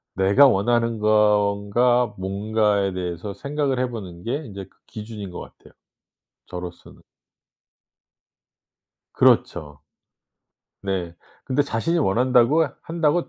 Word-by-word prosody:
'내가 100 +9 +5
원하는 115 +1 +1
건가. 105 +3 +2
뭔가.'에 100 0 0
대해서 90 +2 -5
생각을 140 +3 -2
해 125 -1 0
보는 90 -7 -8
게 140 +5 -3
인제 100 -3 -8
그 - - -30
기준인 105 -3 -8
것 - - -8
같아요 - - -15 0.7
저로서는. 90 -1 -9 2.1
그렇죠. 75 -4 +1 1.0
네. 95 -3 -3 0.3
근데 135 +2 +1
자신이 145 +7 -1
원한다고 125 +5 +3 0.2
한다고 165 0 0
105 Hz, 225 characters per minute, -22 LUFS, 95-125 Hz, 2.1 s, 내가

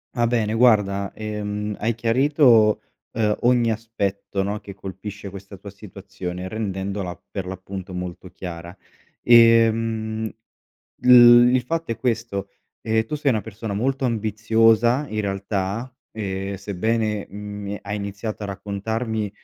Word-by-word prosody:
Va 120 -1 +2
bene, 115 -3 0
guarda, 105 -5 +3
ehm, 105 -1 -4
hai 115 +2 0
chiarito, 120 -2 +4 0.3
uhm, 110 -2 +1
ogni 120 -1 +3
aspetto, 100 -3 -3
no, 100 +2 -3
che 100 - -10
colpisce 100 +2 -8
questa 100 +1 -10
tua 100 +2 -10
situazione, 95 -2 -7
rendendola 95 -3 -4
per 95 -2 -4
l'appunto 95 0 -7
molto 90 0 -6
chiara. 85 -1 -8 0.5
Ehm, 115 -1 +4 0.7
l 120 -1 +8
il 130 - +2
fatto 165 0 -2
è - - -8
questo: 110 -5 -2 0.3
ehm, 110 0 +1
tu 115 - -5
sei 145 -2 +1
una 110 -4 0
persona 110 -1 -6
molto 130 +5 0
ambiziosa, 115 +3 +2
in 110 - -1
realtà, 100 +4 -3 0.2
ehm, 100 -2 -4
sebbene, 105 +2 -1
mhmm, 105 +1 -7
Mi 100 0 -4
è - - -8
hai 100 +1 -4
iniziato 100 +2 -5
a - - -3
raccontarmi 105 +2 -3
105 Hz, 135 wpm, -23 LUFS, 100-115 Hz, 0.7 s, l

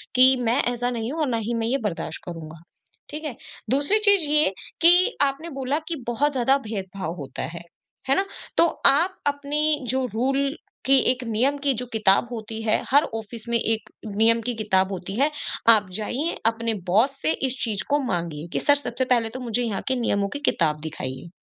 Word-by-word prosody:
कि 260 +1 +7
मैं 240 +4 +2
ऐसा 245 +1 -1
नहीं 230 +1 -3
हूँ 325 - -5
और 300 - +1
ना 230 - 0
ही 240 - -1
मैं 225 - 0
ये 265 - +1
बर्दाश्त 195 -5 -3
करूँगा, 160 -2 -9 0.5
ठीक 300 +2 -7
है? 280 -7 -5 0.3
दूसरी 285 +11 +2
चीज़ 405 -3 +4
ये 300 -8 +4 0.3
कि 360 +7 +5
आपने 285 +4 0
बोला 275 0 -2
कि 335 - -3
बहुत 285 +5 +1
ज़्यादा 265 +1 +2
भेदभाव 190 -5 -5
होता 135 -2 -6
है, 170 - -7 0.5
है 275 - +5
ना? 390 - +1 0.3
तो - - +6 0.2
आप 340 +7 +5
अपनी 290 +1 0
जो 260 +1 +1
रूल 275 +5 0 0.3
की 270 0 +6
एक 255 0 -4
नियम 255 +6 +1
की 280 -2 +2
जो 250 +2 -5
किताब 210 +1 +3
होती 225 -1 -6
है 215 -1 +1
हर 285 +2 +6
ऑफ़िस 225 +1 -7
में 235 - +2
एक 220 -1 -1 0.3
नियम 230 +1 +4
की 245 +2 -2
किताब 195 -3 +1
होती 185 +2 -6
है, 295 +2 +3 0.4
आप 215 -4 +6
जाइए 275 +10 -2
अपने 230 0 +1
बॉस 225 +10 +2
से 155 - +2 0.2
इस 255 0 -5
चीज़ 215 -5 -2
को 290 +1 +2
माँगिए, 170 - -3
कि - - 0
सर 285 - +4
सबसे 260 -2 -2
पहले 235 -3 +1
तो 255 - -8
मुझे 245 -1 -1
यहाँ 215 -5 -2
के 260 - +1
नियमों 200 -3 0
की 285 - -4
किताब 150 -3 0
दिखाइए। 140 0 -6
240 Hz, 200 wpm, -23 LUFS, 210-280 Hz, 0.5 s, कि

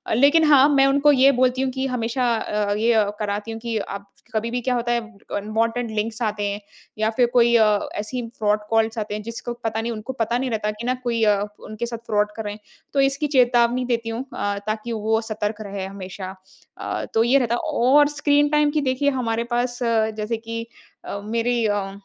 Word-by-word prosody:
लेकिन 285 +7 +5
हाँ, 280 -1 +7
मैं 275 -2 +5
उनको 280 +2 +4
ये 275 0 +6
बोलती 255 0 +2
हूँ 265 - -1
कि 265 +1 -3
हमेशा 240 0 0
अ 210 -2 -1
अ, - - +3
ये 220 -1 +3
कराती 210 +1 -3
हूँ 225 - -6
कि 230 -1 -2
आप 200 0 -6 0.3
कभी 220 +1 -1
भी 245 - -1
क्या 250 +1 0
होता 240 0 -1
है 240 - +2 0.4
अनवांटेड 225 +3 -1
लिंक्स 220 +2 -2
आते 210 -1 -1
हैं 200 0 -3 0.4
या 215 0 +1
फिर 245 -2 +5
कोई 235 -1 +5
अ, 215 -2 +2
ऐसी 245 +4 -3 0.2
फ्रॉड 210 0 +2
कॉल्स 225 0 +1
आते 215 -1 -3
हैं 210 - -4
जिसको 230 +2 -5
पता 225 0 -1
नहीं 235 - -3
उनको 225 +3 -5
पता 235 -1 0
नहीं 260 0 -2
रहता 215 -2 -1
कि 210 +3 -8
ना 250 - +1
कोई 235 -2 0
अ, 205 -2 +3 0.2
उनके 215 +2 -4
साथ 235 0 -5
फ्रॉड 210 -1 +1
कर 220 - -5
रहे 205 -1 -4
हैं 210 - -11 0.3
तो 280 - +1
इसकी 275 +2 +1
चेतावनी 250 -2 +3
देती 230 -2 -1
हूँ 225 +2 -3
अ, 205 0 -2
ताकि 215 +2 -3
वो 220 0 0
सतर्क 215 -1 -3
रहे 200 -2 -5
हमेशा। 190 0 -7 0.4
अ, - - -4
तो 225 - +4
ये 250 +4 +4
रहता 235 -2 +1
है - - -2 0.2
और 285 +4 +6
स्क्रीन 290 0 +3
टाइम 300 0 +3
की 300 0 0
देखिए 265 +1 +1
हमारे 230 -1 -1
पास 245 0 -1 0.4
जैसे 220 +2 -2
कि 230 0 -6 0.4
अ, 200 - -5
मेरी 230 +1 0
अ, 205 -2 -1
230 Hz, 215 wpm, -22 LUFS, 215-250 Hz, 0.4 s, हाँ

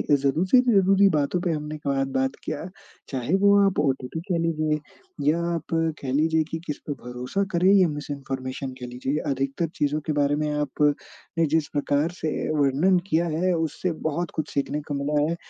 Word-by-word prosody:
ज़रूरी-ज़रूरी 195 - +4
बातों 150 +1 +1
पे 175 - 0
हमने 150 0 -4
क 135 -1 +1
बात 135 +1 +1
किया 155 +1 -4 0.4
चाहे 130 +4 -2
वो 200 0 +7
आप 195 -5 +1
ओटीपी 135 0 -1
कह 175 - +2
लीजिए 155 -2 0 0.5
या 165 +3 +2
आप 165 -2 -2 0.4
कह 130 -2 -3
लीजिए 160 +2 +3
कि 165 - -2
किस 150 - -3
पे 145 - -1
भरोसा 125 +10 -2
करें 175 +2 +4
या 190 -3 +6
मिसइन्फॉर्मेशन 135 -3 -5
कह 125 - -6
लीजिए 125 +4 -2
अधिकतर 135 +5 -1
चीज़ों 150 -1 0
के 155 - +1
बारे 145 0 +2
में 150 0 -1
आप 145 0 -3 0.6
ने 165 - +4
जिस 160 -2 +1
प्रकार 145 +2 +1
से 155 - -1 0.3
वर्णन 150 +7 +3
किया 165 -1 +2
है 185 +1 +2
उससे 165 +2 -1 0.2
बहुत 170 +3 -3
कुछ 155 - -2
सीखने 145 +1 -1
को - - -1
मिला 145 +1 0
है। 170 - -1
150 Hz, 180 wpm, -25 LUFS, 140-170 Hz, 0.6 s, वो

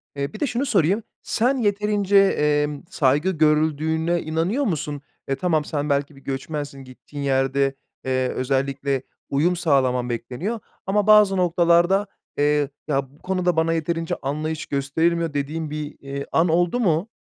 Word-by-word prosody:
Eee, 140 +4 -3
bir 215 - -8
de 290 - +1
şunu 245 +4 -1
sorayım, 200 - +2 0.2
sen 250 +4 +1
yeterince, 205 -2 +1
emm, 150 -6 +2
saygı 145 +6 +2
görüldüğüne 160 +1 +1
inanıyor 165 - -1
musun? 150 - -2 0.3
E, 135 - 0
tamam, 160 -2 0
sen 150 -1 -2
belki 140 +1 0
bir 135 - -16
göçmensin, 140 0 -5
gittiğin 140 +3 -9
yerde, 135 0 +1 0.3
eee, 130 -1 +1
özellikle 135 +1 -1 0.3
uyum 160 +6 +2
sağlaman 130 -7 +1
bekleniyor 130 - -3 0.3
ama 205 +2 +1
bazı 210 -2 +6
noktalarda, 175 +2 +3 0.3
eee, 145 -1 +2 0.2
"Ya 135 -3 0
bu 145 - -23
konuda 180 -2 0
bana 160 +1 +2
yeterince 165 0 -1
anlayış 155 +3 -3
gösterilmiyor." 160 +4 0
dediğin 150 +3 -3
bir, 150 0 -5
iii, 140 0 -6
an 170 +2 +3
oldu 175 +7 +2
mu? 185 -1 +1
155 Hz, 145 wpm, -23 LUFS, 140-180 Hz, 0.3 s, bazı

